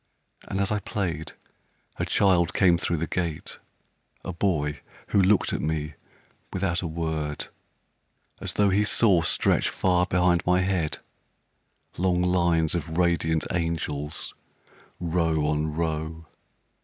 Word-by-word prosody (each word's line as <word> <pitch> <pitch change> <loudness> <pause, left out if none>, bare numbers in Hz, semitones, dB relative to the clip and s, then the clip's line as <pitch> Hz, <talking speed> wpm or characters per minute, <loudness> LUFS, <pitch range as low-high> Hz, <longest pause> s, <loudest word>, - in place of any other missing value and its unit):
And 95 - -3
as 100 0 +1
I 105 - +1
played, 85 -7 -3 0.6
a - - -2
child 90 -4 +3
came 90 -3 +5
thro' 85 - 0
the 80 - -1
gate, 85 -3 -3 0.7
A 95 - -4
boy 80 -5 0 0.3
who 100 - +4
looked 95 +2 +3
at - - -1
me 75 -1 -2 0.6
without 90 -2 -1
a 90 - -3
word, 80 -2 -3 0.9
As - - -4
tho' 105 -1 +3
he 100 +2 +3
saw 100 -4 +4
stretch 80 - +2
far 90 -1 +1
behind 90 -1 +2
my 90 +1 +3
head 90 -5 0 1.0
Long 90 -1 +2
lines 85 -3 +2
of 80 -1 -3
radiant 85 -2 +2
angels, 80 -4 -3 0.7
row 80 -3 +1
on 75 0 0
row. 80 0 -3
85 Hz, 130 wpm, -26 LUFS, 80-90 Hz, 1.0 s, came